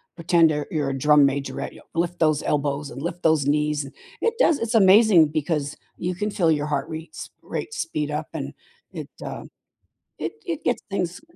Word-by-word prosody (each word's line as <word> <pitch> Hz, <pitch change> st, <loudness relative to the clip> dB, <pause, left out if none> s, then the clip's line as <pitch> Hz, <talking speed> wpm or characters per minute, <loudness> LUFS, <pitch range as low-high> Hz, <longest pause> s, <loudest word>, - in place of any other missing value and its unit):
Pretend 170 Hz, -1 st, +4 dB
you're 150 Hz, -1 st, -2 dB
you're 150 Hz, -3 st, -1 dB
a 135 Hz, -, -3 dB
drum 150 Hz, +1 st, +5 dB
majorette, 135 Hz, -1 st, -3 dB
yo -, -, -14 dB
lift 170 Hz, +1 st, -1 dB
those 155 Hz, -2 st, +2 dB
elbows 145 Hz, 0 st, -1 dB
and 135 Hz, -, -8 dB
lift 175 Hz, +2 st, -5 dB
those 155 Hz, -4 st, +3 dB
knees 150 Hz, 0 st, +1 dB
and 135 Hz, -, -11 dB, 0.3 s
it 460 Hz, -, +1 dB
does 330 Hz, -, +4 dB
it's 230 Hz, +1 st, -2 dB
amazing 195 Hz, -5 st, +6 dB
because 150 Hz, -1 st, -2 dB, 0.2 s
you 180 Hz, +1 st, -2 dB
can 210 Hz, +4 st, -2 dB
feel 170 Hz, -5 st, +2 dB
your 150 Hz, -1 st, 0 dB
heart 145 Hz, 0 st, -2 dB
rates 160 Hz, 0 st, -7 dB
rate -, -, -5 dB
speed 150 Hz, -, -3 dB
up 150 Hz, +1 st, -3 dB
and -, -, -5 dB, 0.4 s
it, -, -, -7 dB, 0.2 s
uh, -, -, -6 dB, 0.8 s
it -, -, -3 dB
it 330 Hz, -3 st, -3 dB
gets 245 Hz, -, 0 dB
things 180 Hz, -3 st, -2 dB
155 Hz, 190 wpm, -24 LUFS, 145-180 Hz, 0.8 s, amazing